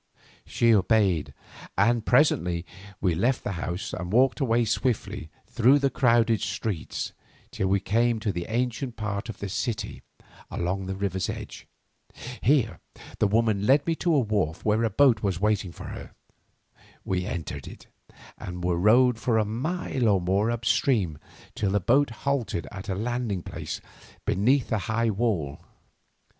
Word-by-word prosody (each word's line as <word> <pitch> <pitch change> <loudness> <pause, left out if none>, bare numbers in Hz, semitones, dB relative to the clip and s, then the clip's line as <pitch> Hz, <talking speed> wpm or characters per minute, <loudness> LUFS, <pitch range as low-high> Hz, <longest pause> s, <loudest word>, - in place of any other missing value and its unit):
'" - - -29
She 115 -1 +5
obeyed, 100 -5 +2 0.5
and 115 +4 +3
presently 90 - +2 0.4
we 90 -3 +2
left 120 +10 +1
the - - -2
house 90 0 -4
and 90 0 -4
walked 130 +5 +3
away 120 -3 +2
swiftly 115 - -1 0.2
through 125 +5 +4
the 140 -1 +1
crowded 115 -3 +3
streets 100 -8 -3 0.4
till 95 - -1
we 100 +1 +2
came 115 +4 +1
to 105 - 0
the 85 -1 -4
ancient 120 +1 -2
part 105 +1 -3
of 115 - -6
the 100 - -5
city 105 +3 -3 0.5
along 95 +2 -2
the 95 - -3
river's 95 -1 -2
edge. - - -7 0.7
Here 130 -5 +2 0.4
the 105 - +4
woman 105 -1 +1
led 140 +2 +4
me 165 - +1
to 170 -2 +1
a - - +5
wharf 100 - -1
where 110 +2 +2
a 115 - +2
boat 115 0 +4
was 100 -3 0
in 95 - -7
waiting 105 -4 +1
for - - -9
her. - - -9 0.9
We 90 -1 -1
entered 85 -4 -5
it, - - -11 0.5
and 90 0 -6
were 90 -1 +1
rowed 120 +4 +4
for 115 -1 +1
a 110 - +2
mile 130 - -1
or 100 -2 +4
more 95 +5 +1
up 120 -1 -2
the - - -2
stream 95 - +1 0.3
till 100 - -1
the 105 +1 +2
boat 135 +9 +3 0.2
halted 130 - -1
at 100 +2 -8
a 95 - -1
landing 115 -3 -2
place - - -6 0.5
beneath 125 +7 +2
a 110 - +2
high 115 +2 0
wall. 95 -10 -1
110 Hz, 165 wpm, -26 LUFS, 95-120 Hz, 0.9 s, She